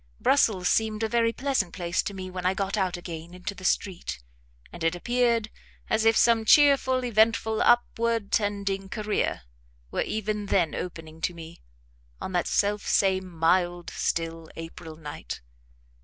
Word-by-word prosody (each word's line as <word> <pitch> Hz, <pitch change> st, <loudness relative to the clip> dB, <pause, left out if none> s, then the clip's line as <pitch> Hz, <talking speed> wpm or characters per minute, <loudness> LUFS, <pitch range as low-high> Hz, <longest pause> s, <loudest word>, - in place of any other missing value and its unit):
Brussels 215 Hz, -10 st, +3 dB
seemed 220 Hz, 0 st, +1 dB
a -, -, +2 dB
very 230 Hz, 0 st, +2 dB
pleasant 260 Hz, -8 st, -1 dB
place 175 Hz, -1 st, -1 dB
to 200 Hz, -, -5 dB
me 185 Hz, -1 st, -6 dB
when 180 Hz, 0 st, -5 dB
I 185 Hz, +1 st, +2 dB
got 195 Hz, +1 st, -1 dB
out 190 Hz, -4 st, 0 dB
again 170 Hz, 0 st, -8 dB
into 180 Hz, +3 st, -5 dB
the 185 Hz, -, -12 dB
street, 185 Hz, -, -1 dB, 0.5 s
and 170 Hz, -, -7 dB
it 165 Hz, +1 st, +2 dB
appeared 235 Hz, +2 st, +1 dB, 0.4 s
as 220 Hz, 0 st, +2 dB
if 225 Hz, 0 st, +5 dB
some 230 Hz, -1 st, +4 dB
cheerful, 265 Hz, -1 st, +5 dB
eventful, 220 Hz, -1 st, +2 dB
upward 230 Hz, -3 st, +2 dB
tending 200 Hz, -2 st, -1 dB
career 215 Hz, -, -1 dB, 0.5 s
were -, -, -1 dB
even 210 Hz, -1 st, -2 dB
then 175 Hz, -6 st, +2 dB
opening 160 Hz, -2 st, -7 dB
to 175 Hz, -, -1 dB
me, 165 Hz, 0 st, -11 dB, 0.6 s
on -, -, -5 dB
that 175 Hz, -2 st, 0 dB
selfsame 195 Hz, -2 st, +1 dB
mild, 175 Hz, +1 st, +1 dB
still 165 Hz, -1 st, -2 dB
April 165 Hz, 0 st, -8 dB
night. 145 Hz, -, -7 dB
195 Hz, 150 wpm, -26 LUFS, 175-220 Hz, 0.6 s, if